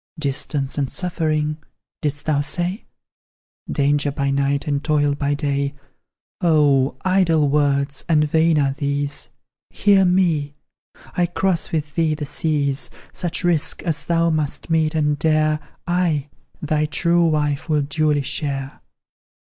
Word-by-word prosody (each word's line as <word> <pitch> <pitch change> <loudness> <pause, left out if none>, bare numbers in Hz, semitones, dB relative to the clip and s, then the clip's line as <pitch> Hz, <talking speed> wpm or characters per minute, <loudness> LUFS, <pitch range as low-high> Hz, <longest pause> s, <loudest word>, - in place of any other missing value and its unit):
"Distance 140 -1 -1
and 135 -2 0
suffering," 155 -4 -1 0.4
didst 145 -1 -3
thou 150 -2 +2
say? 175 - -3 0.9
"Danger 145 0 +1
by 140 0 -1
night, 140 +1 0
and 145 -1 -1
toil 145 -2 +2
by 145 0 -1
day?" 140 -1 -1 0.7
Oh, 145 -5 +3
idle 175 -5 +3
words 140 0 +1
and 150 -2 +4
vain 160 +1 +3
are 140 -2 +2
these; 140 0 -2 0.4
Hear 200 -1 +4
me! 170 -6 +1 0.6
I 175 -1 +2
cross 175 0 -1
with 150 -3 -2
thee 160 -2 +1
the 150 - -4
seas. 145 -2 -1 0.2
Such 175 0 -3
risk 165 -3 +1
as 160 -3 -2
thou 170 0 +2
must 155 +1 -3
meet 160 0 +2
and 150 -2 +1
dare, 155 -1 +2 0.3
I 170 -5 0 0.3
thy 155 0 +1
true 170 +2 +2
wife 150 -1 0
will 150 -2 +2
duly 150 0 +1
share. 135 -1 -3
150 Hz, 130 wpm, -21 LUFS, 145-165 Hz, 0.9 s, and